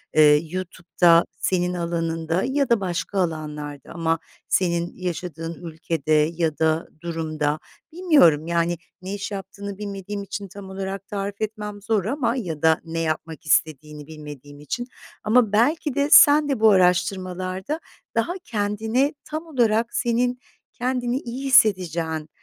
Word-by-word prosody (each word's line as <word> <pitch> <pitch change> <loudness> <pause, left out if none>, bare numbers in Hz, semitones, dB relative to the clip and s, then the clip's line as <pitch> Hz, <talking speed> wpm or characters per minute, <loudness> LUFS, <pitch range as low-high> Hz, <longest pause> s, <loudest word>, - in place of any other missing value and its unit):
eee, 150 -1 +7
YouTube'da 175 -2 +2
senin 180 -1 0
alanında 165 0 -1
ya 275 0 0
da 235 -2 +4
başka 190 +1 -2
alanlarda 150 -4 -4
ama 165 -1 0 0.3
senin 170 -1 0
yaşadığın 170 -2 -5
ülkede 160 -1 -4 0.2
ya 160 -3 0
da 160 0 +1
durumda 155 -3 -2 0.3
Bilmiyorum, 290 - +4
yani, 170 0 +1 0.2
ne 190 +2 -5
iş 205 +1 -5
yaptığını 200 0 -7
bilmediğim 200 0 -5
için 200 0 -6
tam 195 +1 -10
olarak 195 0 -5
tarif 200 0 -4
etmem 210 -1 -4
zor 210 -2 0
ama 240 0 0
ya 170 - -4
da 160 -1 +4
ne 165 0 -4
yapmak 160 +1 -3
istediğini 150 0 0
bilmediğim 145 -2 -10
için 240 - -4 0.4
ama 220 0 +3
belki 275 +6 +2
de 285 +1 +1
sen 295 -1 +8
de 270 -5 0
bu 220 0 +6
araştırmalarda 185 - +1 0.4
daha 230 +10 +1
kendini 220 - 0
tam 310 +2 -5
olarak 235 -6 +1
senin 245 +1 +1 0.3
kendini 250 0 -1
iyi 255 +1 -6
hissedeceğin 175 - +3
185 Hz, 135 wpm, -23 LUFS, 165-225 Hz, 0.4 s, sen